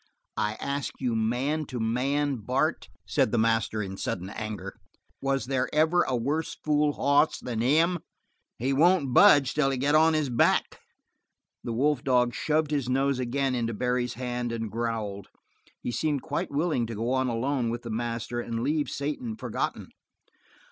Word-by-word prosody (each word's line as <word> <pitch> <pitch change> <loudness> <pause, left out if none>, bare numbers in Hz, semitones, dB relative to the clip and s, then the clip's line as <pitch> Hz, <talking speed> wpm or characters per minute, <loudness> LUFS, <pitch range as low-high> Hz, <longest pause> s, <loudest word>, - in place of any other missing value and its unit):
"I 105 - 0
ask 140 +2 -3
you 125 -3 -1
man 130 +7 0
to 125 - -5
man, 135 +5 0
Bart," 130 +3 -1 0.2
said 110 +9 +1
the 120 - +1
master 115 -1 +1
in 95 0 -6
sudden 95 +1 -4
anger, 110 -2 -6 0.4
"was 135 0 0
there 130 0 0
ever 160 +3 +3
a 130 - 0
worse 145 +7 -1
fool 150 -1 +1
hoss 145 +3 +3
than 115 -3 -3
him? 165 +8 +3 0.6
He 130 +4 0
won't 155 -2 +3
budge 145 -7 +6
till 150 -2 +2
I 135 - 0
get 140 +3 +1
on 160 +1 +5
his 150 -4 0
back." 120 - +2 0.8
The 120 - -4
wolf 140 +4 +1
dog 125 -3 +2
shoved 155 +5 0
his 140 -4 -1
nose 135 0 +1
again 130 +2 0
into 115 -2 -1
Barry's 125 +1 -1
hand 125 -1 -3
and 115 -2 -4
growled. 110 -4 -3 0.6
He - - -2
seemed 145 +1 -1
quite 150 -2 -2
willing 145 -5 0
to 115 - -5
go 115 +4 -2
on 130 0 +1
alone 125 +1 0
with 120 +1 -4
the 115 - -5
master 120 +1 -3
and 115 -1 -3
leave 150 +2 0
Satan 185 - -3
forgotten. - - -3
130 Hz, 170 wpm, -27 LUFS, 115-145 Hz, 0.8 s, budge